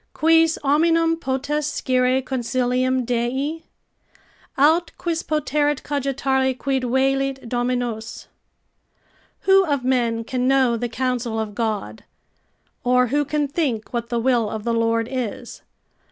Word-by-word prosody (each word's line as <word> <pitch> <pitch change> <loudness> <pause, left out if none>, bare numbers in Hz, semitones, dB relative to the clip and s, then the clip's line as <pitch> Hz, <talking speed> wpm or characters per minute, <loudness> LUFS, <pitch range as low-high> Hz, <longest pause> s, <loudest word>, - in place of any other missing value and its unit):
"Quis 325 0 +4
hominum 330 +3 +3
potest 285 0 -2
scire 255 0 +1
consilium 255 0 0
Dei? 260 +7 -1 1.0
Aut 320 +5 +3
quis 335 -2 -2
poterit 295 -1 0
cogitare 265 -2 0
quid 270 -1 -1
velit 270 +1 0
Dominus?" 240 -2 -3 1.1
["Who 385 0 +5
of 285 -7 -1
men 235 -3 +1
can 250 +1 -2
know 260 -3 +3
the 240 +1 -3
counsel 245 -2 -2
of 215 -1 -4
God? 210 - -3 0.8
or 250 0 +3
who 290 +3 +1
can 295 0 -1
think 270 -8 -2
what 235 -1 -3
the 240 - -1
will 235 -2 +1
of 215 -1 -5
the 235 - -1
Lord 230 0 +1
is." 245 -2 -5
260 Hz, 125 wpm, -22 LUFS, 240-285 Hz, 1.1 s, Who